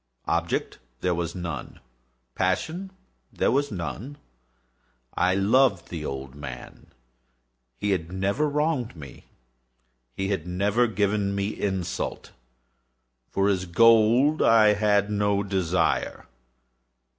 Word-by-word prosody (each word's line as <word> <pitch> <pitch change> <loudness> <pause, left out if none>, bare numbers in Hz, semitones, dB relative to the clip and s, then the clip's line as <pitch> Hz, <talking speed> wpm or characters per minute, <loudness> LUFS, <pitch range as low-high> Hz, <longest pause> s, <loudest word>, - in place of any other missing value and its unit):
Object 85 0 -1 0.2
there 90 - +1
was 85 -1 -3
none. 85 -2 -6 0.5
Passion 180 - -1 0.4
there - - +1
was 140 +2 +1
none. 110 +9 -5 1.0
I 95 +1 +2
loved 100 -1 +3
the 80 -3 -5
old 70 -2 -5
man. 65 -3 -9 0.9
He 105 - -1
had 90 -3 -2
never 100 +11 0
wronged 150 - -1
me. 70 -4 -12 0.9
He 95 0 -2
had 95 -5 -2
never 100 +7 +1
given 100 -1 0
me 100 +1 -1
insult. 95 -4 -3 1.0
For 100 0 +1
his 95 -2 0
gold 115 - +5
I 110 -2 +6
had 105 0 +2
no 100 -1 +1
desire. 95 -3 0
100 Hz, 110 wpm, -25 LUFS, 90-115 Hz, 1.0 s, I